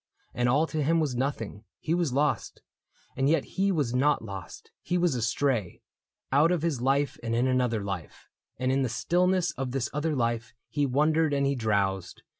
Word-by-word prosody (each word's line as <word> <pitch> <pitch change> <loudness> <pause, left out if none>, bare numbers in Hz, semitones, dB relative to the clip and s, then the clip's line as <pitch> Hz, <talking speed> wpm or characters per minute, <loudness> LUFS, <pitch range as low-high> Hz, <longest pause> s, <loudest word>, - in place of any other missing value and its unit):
And 120 0 +1
all 145 +6 +3
to 155 -1 -3
him 165 +3 +2
was 145 -6 0
nothing: 120 -5 -3 0.2
he 160 - -1
was 170 -5 +1
lost. 145 +3 -1 0.5
And 135 +2 +1
yet 165 - +3
he 195 +1 0
was 145 -9 0
not 135 -1 +2
lost: 95 -4 -9
he 180 - -1
was 175 -3 +2
astray 115 -3 -1 0.2
— - - -56
Out 150 +5 +4
of 175 -3 0
his 155 -8 0
life 140 +2 +1
and 115 -1 -2
in 120 +2 +2
another 125 -4 +1
life; 95 -4 -6 0.3
And 130 +1 0
in 135 +1 +2
the 130 - 0
stillness 180 +8 +1
of 130 -3 -4
this 130 -5 -1
other 150 +1 -1
life 115 -1 -1
He 145 -1 0
wondered 150 +3 +2
and 140 0 +1
he 140 - +2
drowsed. 100 -6 -1
135 Hz, 195 wpm, -28 LUFS, 115-155 Hz, 0.5 s, Out